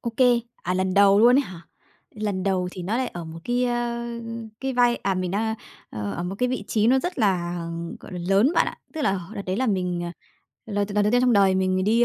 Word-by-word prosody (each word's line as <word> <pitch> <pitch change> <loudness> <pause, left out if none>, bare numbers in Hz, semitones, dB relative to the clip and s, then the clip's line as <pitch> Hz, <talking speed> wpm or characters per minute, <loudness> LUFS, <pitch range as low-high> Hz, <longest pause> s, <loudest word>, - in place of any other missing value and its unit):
Ô 235 - -3
kê, 245 -2 +4 0.2
à, 180 - -1
lần 185 0 0
đầu 200 0 +6
luôn 245 +3 +7
ấy - - +5
hả? 180 -9 -10 0.5
Lần 205 -3 -3
đầu 185 -2 0
thì 185 - -7
nó 200 +6 -1
lại 255 0 0
ở 175 -5 -7
một 160 0 -8
cái, 245 +1 +1
a, 240 -1 -1 0.5
cái 265 0 -2
vai 245 -1 +3
à, 195 0 -1
mình 185 -1 -2
đang 220 +3 0 0.4
ờ, 105 -1 -4
ở 175 - -4
một 180 +2 -4
cái 250 - +1
vị 255 -5 -3
trí 215 -1 +2
nó 260 +3 +5
rất 355 +5 -3
là, 180 -5 +1 0.4
gọi - - -12
là, 180 - -4
lớn 205 +10 +4
bạn - - +4
ạ. - - -5 0.2
Tức 310 - -3
là 195 - +2
h 180 +4 -10
đợt 200 - -4
đấy 185 +1 -1
là 260 - 0
mình, 180 -4 -1
à, 170 - -5 0.5
lần 205 -2 -1
đ 205 - -11
lần 210 - +3
đầu 210 - +2
tiên 245 - +4
trong 250 -1 +3
đời 195 -3 +4
mình 185 0 +1
đi 230 +4 +4
205 Hz, 265 wpm, -24 LUFS, 185-240 Hz, 0.5 s, luôn